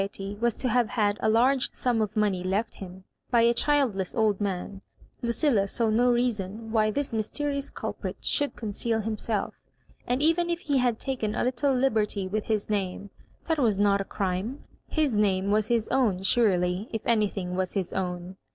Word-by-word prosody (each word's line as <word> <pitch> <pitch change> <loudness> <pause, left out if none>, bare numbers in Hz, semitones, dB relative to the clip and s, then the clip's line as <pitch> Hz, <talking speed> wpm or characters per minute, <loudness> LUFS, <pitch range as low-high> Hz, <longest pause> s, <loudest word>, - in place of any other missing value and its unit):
83 195 0 -4
ety 200 +1 -5
was 235 -2 +2
to 255 - -2
have 245 -2 +2
had 210 -4 +1
a - - +1
large 250 +4 +3
sum 240 -3 0
of 215 0 -2
money 200 -4 +1
left 200 +5 -1
him 185 -1 -10 0.3
by 235 -2 +4
a 235 +1 +4
childless 240 -10 +1
old 215 -3 +1
man, 195 0 -3 0.4
Lucilla 235 -3 +2
saw 225 +2 +1
no 240 +3 +3
rea 245 +1 +2
son 215 +2 -7
why 215 -1 +3
this 265 +3 -2
mysterious 280 +6 -1
culprit - - -5
should 290 -1 0
conceal 225 +1 -2
himself; 215 -1 -1 0.5
and 250 +4 0
even 335 +2 +2
if 340 0 -2
he 285 -5 +1
had 245 -3 +1
taken 235 -6 -2
a - - 0
little 260 +2 +1
liberty 215 -6 +1
with 210 +2 -2
his 215 -2 -1
name, 200 -1 -3 0.4
that 320 -2 +1
was 225 -7 +2
not 200 0 +3
a - - -1
crime 195 +7 -3
— - - -39
his 290 -7 +2
name 195 -1 +1
was 215 0 +2
his 230 -2 +1
own 215 -9 +1
surely, 190 -2 +2
if 225 - -4
anything 200 -5 0
was 185 0 -1
his 190 -4 -2
own. 180 0 -4
215 Hz, 190 wpm, -27 LUFS, 195-245 Hz, 0.5 s, by